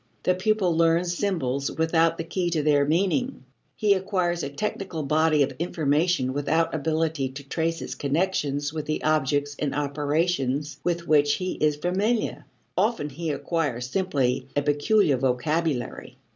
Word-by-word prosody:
The 185 - +3
pupil 190 -2 +1
learns 170 +2 +2
symbols 140 -9 -1
without 165 0 +2
the - - -3
key 175 +1 -2
to 160 -3 0
their 145 -1 +3
meaning. 195 - 0 0.3
He 210 -2 +3
acquires 185 -3 0
a 140 - -3
technical 185 0 -4
body 155 +1 +3
of 135 0 -2
information 155 -3 +1
without 150 +4 +1
ability 155 -2 0
to 140 +1 -10
trace 165 +2 -1
its - - -5
connections 145 -2 -1
with 155 -2 -4
the 155 - -2
objects 145 -1 +1
and 145 -2 -1
operations 145 0 -1
with 170 -1 -1
which 145 -1 +4
he 185 0 -3
is 150 -1 +1
familiar 195 +9 -1 0.3
often 200 -5 +1
he 165 +4 -4
acquires 145 -5 -2
simply 135 -9 0
a 145 - +1
peculiar 145 +2 +3
vocabulary. 135 +2 -1
155 Hz, 145 wpm, -25 LUFS, 145-175 Hz, 0.3 s, which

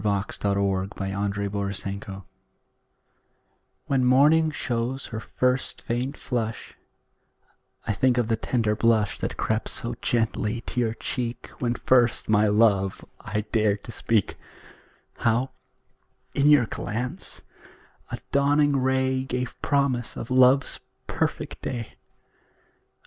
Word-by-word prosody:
MORNING, 100 -1 0
NOON 100 -1 +1
AND 100 0 -2 0.5
NIGHT 100 0 -6 1.6
When 135 -2 +1
morning 150 +6 +5
shows 125 -2 -2
her 110 - -5
first 125 +3 -1
faint 125 +4 -2
flush, 115 -3 -4 1.1
I 110 - 0
think 125 +4 +2
of 120 -3 +2
the 115 - +2
tender 110 -1 0
blush 110 -2 +2
That - - -3
crept 110 0 -1
so 120 +1 -2
gently 115 -1 0
to 125 - -4
your 115 -2 0
cheek 120 -1 -4
When 120 -1 0
first 120 -2 +3
my 105 0 +4
love 105 -3 +2
I 105 0 -2
dared 105 -3 +2
to 115 - -8
speak; 110 -1 0 0.8
How, 120 +3 +1 0.8
in 140 +1 +3
your 145 -5 +6
glance, 120 +3 -5 0.7
a - - -4
dawning 145 0 +3
ray 130 0 +1
Gave 125 -1 -4
promise 140 -4 0
of 120 - -6
love's 130 +1 +4 0.3
perfect - - -3
day. 120 -3 -4
120 Hz, 115 wpm, -25 LUFS, 105-130 Hz, 1.6 s, your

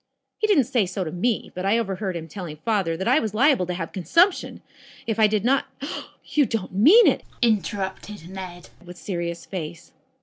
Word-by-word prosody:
He 430 - +1
didn't 370 -10 +4
say 225 -4 0
so 185 +1 -3
to 160 - -5
me, 215 +7 -1
but 180 - -5
I 200 +4 +3
overheard 195 -4 -2
him 165 -1 -5
telling 165 -2 -7
father 195 -7 0
that 190 - -3
I 260 +5 +5
was 215 -5 -3
liable 255 - +3
to 180 - -3
have 165 -2 -5
consumption, 335 - +1 0.4
if 225 -1 -2
I 215 - +6
did 210 0 -1
not 270 +2 +2 0.3
" - - -19
"You 290 -4 +4
don't 215 -5 -3
mean 320 - +7
it?" - - +3 0.2
interrupted 205 -4 -2
Ned 185 -2 -9
with 180 0 -11
serious 170 -3 -4
face. 170 -3 -7
195 Hz, 195 wpm, -24 LUFS, 180-230 Hz, 0.4 s, mean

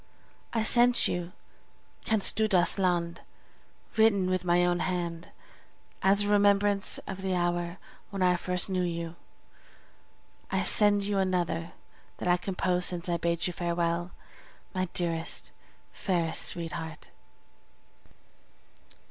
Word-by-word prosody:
I 225 -2 0
send 240 +2 +4
you 175 0 -3 0.7
"Kennst 220 -3 +2
Du 220 0 +2
das 180 0 +3
Land," 175 -2 0 0.7
written 200 -4 +3
with 185 -1 -1
my 175 0 +3
own 175 0 +1
hand, 175 -2 -3 0.7
as 200 +1 +3
a - - -2
remembrance 205 -1 +3
of 190 -1 -7
the 190 -1 -1
hour 175 0 -1 0.3
when 195 -2 -2
I 180 0 +4
first 180 +1 -2
knew 185 -2 -1
you; 170 -1 -3 1.3
I - - 0
send 205 -1 +6
you 200 0 -1
also 190 -1 +2
another 175 -2 -2 0.4
that - - -5
I 175 0 +4
composed 180 -1 -1
since 175 0 -3
I 170 - +1
bade 170 0 -1
you 180 - -2
farewell, 170 0 -1 0.6
my 185 0 -1
dearest, 165 -2 -2 0.4
fairest 170 -4 -1
sweetheart! 165 -2 -6
180 Hz, 125 wpm, -28 LUFS, 170-195 Hz, 1.3 s, send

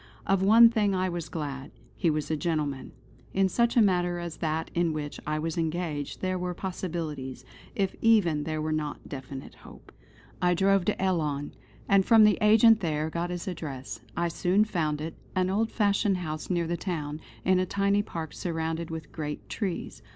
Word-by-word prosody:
Of 195 -1 +2
one 225 +4 +8
thing 205 -4 +1
I 185 0 0
was 170 -3 -4
glad, 140 -4 -5 0.3
he 170 - +1
was 155 0 -1
a - - +2
gentleman. 150 -5 -2 0.4
In 195 0 +4
such 235 +5 +1
a 230 - +7
matter 180 -3 +2
as 170 -2 -5
that 160 0 -2
in 170 -2 +1
which 150 -1 -5
I 155 0 0
was 160 +2 -2
engaged, 160 -3 -3
there 185 -1 -1
were 180 0 -3
possibilities, 155 -9 -5 0.3
if 195 -2 0
even 185 -10 +4
there 155 0 -3
were 155 - -1
not 155 -1 -3
definite 135 -1 -8
hope. - - -14 0.5
I 180 0 +3
drove 195 0 +3
to 210 - 0
Ellon; 155 -7 -1 0.3
and 195 -1 +5
from 225 +1 +6
the 210 -1 +5
agent 220 +1 +6
there 155 -4 -1
got 170 +2 -2
his 180 +2 -5
address. 140 -9 -5 0.2
I 170 0 +1
soon 185 +5 +2
found 155 -7 -1
it; 160 +1 -4 0.2
an 185 0 +1
old 220 +3 +1
fashioned 205 -2 +2
house 155 -3 -5
near 175 -2 +1
the 170 +1 -2
town, 155 -5 -4 0.2
in 185 0 +4
a 185 - 0
tiny 200 +1 +2
park 165 -6 -6
surrounded 165 -1 -3
with 160 -1 -7
great 150 -1 -5
trees. 195 -6 -4
170 Hz, 185 wpm, -28 LUFS, 155-190 Hz, 0.5 s, one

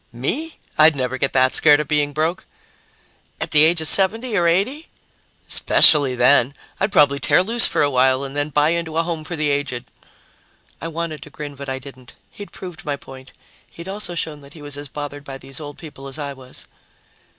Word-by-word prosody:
"Me? 260 - -4 0.2
I'd 155 0 +6
never 130 -1 -3
get 135 - 0
that 130 0 +2
scared 150 -2 +5
of 150 - -3
being 145 -1 0
broke!" 155 +4 -3 0.9
"At - - -4
the 150 0 +6
age 165 +1 +3
of 160 - +1
70 220 +7 +4
or 175 -3 +2
80?" 210 - -1 0.6
"Especially 140 -4 +5
then! 125 +2 +3 0.2
I'd 195 +2 -1
probably 145 -7 +3
tear 160 - +2
loose 230 +4 +6
for - - 0
a 145 - +1
while 130 +1 +2
and 135 0 -8
then 145 +1 -2
buy 150 +1 +1
into 165 -1 -3
a 165 - +2
home 165 -2 -5
for 175 +3 -6
the 150 -2 -1
aged." 130 -3 -4 0.9
I 165 - -5
wanted 165 -2 -5
to - - -11
grin, 145 -1 -8
but 140 0 -9
I 130 - -3
didn't. 130 -2 -14 0.2
He'd 205 - -11
proved 180 -4 -10
my 145 -1 -3
point. 130 -1 -14 0.4
He'd 170 +2 -12
also 195 -2 -5
shown 155 -3 -3
that 140 0 -16
he 155 - -13
was 145 -1 -7
as 145 0 -6
bothered 145 +1 -8
by 135 -2 -9
these 135 +2 -11
old 145 -2 -9
people 145 -4 -11
as 135 - -6
I 145 -2 -5
was. 130 -1 -11
145 Hz, 205 wpm, -20 LUFS, 135-165 Hz, 0.9 s, I'd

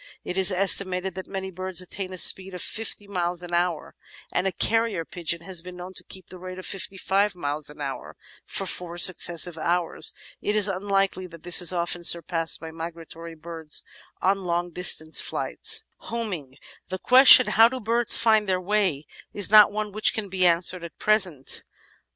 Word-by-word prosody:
It 180 - -6
is 190 +1 +3
estimated 185 0 0
that 190 +1 -8
many 190 -1 -6
birds 185 0 -2
attain 185 +1 -5
a 185 - -8
speed 190 +1 +4
of 180 - -6
fifty 215 -1 -4
miles 180 -3 -4
an 175 0 -9
hour, 175 -1 -2 0.4
and 180 - -1
a - - -1
carrier 225 -5 -1
pigeon 170 0 -3
has 180 -1 -2
been 180 +1 -11
known 180 +1 -10
to - - -7
keep 185 -2 -9
up - - -23
the 185 - -11
rate 185 0 -9
of 185 - -9
fifty 195 0 -5
five 195 +1 0
miles 145 -2 -5
an 150 0 -13
hour 135 -3 -7 0.3
for 195 - -5
four 175 -2 -5
successive 175 -1 +2
hours. 175 +1 -1 0.3
It 210 - -2
is 210 -1 +4
unlikely 195 -1 -2
that 170 -2 -15
this 175 +1 +4
is 175 - +6
often 175 0 -3
surpassed 165 -1 +1
by 160 0 -9
migratory 165 0 -10
birds 160 -1 -3 0.4
on 195 0 0
long 175 0 -2
distance 160 -2 +2
flights. - - 0
"Homing" 185 - -6 0.3
The 185 - -4
question 255 +3 +8
"How 225 +1 +4
do 260 +1 -6
birds 230 +1 +3
find 220 -3 +2
their 185 -1 0
way?" 185 -6 -1 0.3
is 205 -1 +1
not 210 -1 +7
one 210 0 -4
which 215 +2 +3
can 210 -3 -4
be 185 -1 +2
answered 175 +1 +1
at 170 - -10
present. 185 -10 +1
185 Hz, 185 wpm, -24 LUFS, 170-195 Hz, 0.4 s, question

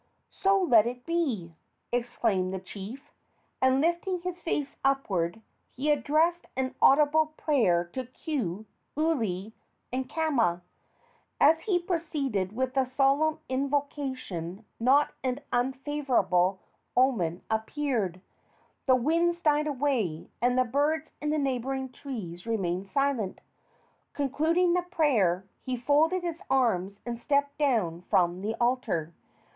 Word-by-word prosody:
"So 390 0 +2
let 235 - +5
it 245 +1 -6
be!" 265 - -1 0.4
exclaimed 230 -6 0
the 190 - -3
chief; 205 +8 -9 0.5
and, 260 +1 +4
lifting 345 +2 0
his 360 0 -5
face 290 -4 -2
upward, 220 -8 0 0.3
he 295 +4 +1
addressed 315 +4 +2
an 260 0 -1
audible 305 +2 +5
prayer 220 - +2
to 260 -2 -4
Ku, 235 - -4 0.3
Uli 225 - 0 0.4
and 260 0 -2
Kama. 240 - +1 0.8
As 320 +2 +6
he 365 +2 +1
proceeded 285 - -2
with 260 +1 -1
the 265 -1 +2
solemn 280 +5 +2
invocation 260 - -3
not 270 +5 +4
an 260 +1 -1
unfavorable 245 -8 +1 0.4
omen 215 -10 +2
appeared. 220 - -1 0.7
The 260 - +6
winds 335 +7 +1
died 300 -2 +2
away 250 - -1
and 245 +1 +2
the 255 - +4
birds 295 +6 0
in 300 - -1
the 305 - +1
neighboring 265 -1 -2
trees 220 - -7
remained 190 -4 -1
silent. 265 -4 0 0.7
Concluding 320 +6 +2
the 360 - +2
prayer, 250 - +1 0.2
he 255 -1 -2
folded 305 +8 +2
his 335 -1 -4
arms 200 -7 +1
and 235 -1 -4
stepped 280 +2 +1
down 215 - +1
from 175 0 +2
the 215 +3 -2
altar. 235 -10 0
260 Hz, 120 wpm, -28 LUFS, 215-300 Hz, 0.8 s, As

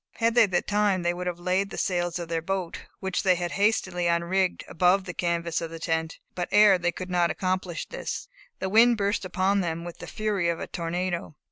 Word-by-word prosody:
Had 230 0 +1
they 235 -2 +6
the 180 -2 0
time 205 -3 +1
they 175 0 +1
would 180 +1 -5
have 175 -1 -2
laid 185 +3 0
the - - -8
sails 175 -2 0
of 170 -1 -5
their 165 0 -1
boat, 185 0 -4 0.2
which 190 -1 -1
they 185 -1 +4
had 175 -1 -3
hastily 190 -4 +1
unrigged, 170 +2 +1
above 180 +3 +3
the 180 - -6
canvas 170 -1 -1
of 165 - -4
the 165 - -7
tent; 160 0 -2 0.2
but 175 -1 -3
ere 205 -2 +6
they 175 0 +1
could 185 +1 -6
accomplish 180 0 0
this, - - -5 0.3
the - - -3
wind 230 +4 +5
burst 200 -1 0
upon 190 +2 +1
them 170 -1 -3
with 175 -1 -8
the - - -8
fury 205 -5 -1
of 170 - -1
a - - -4
tornado. 175 -1 -3
180 Hz, 215 wpm, -26 LUFS, 170-195 Hz, 0.3 s, they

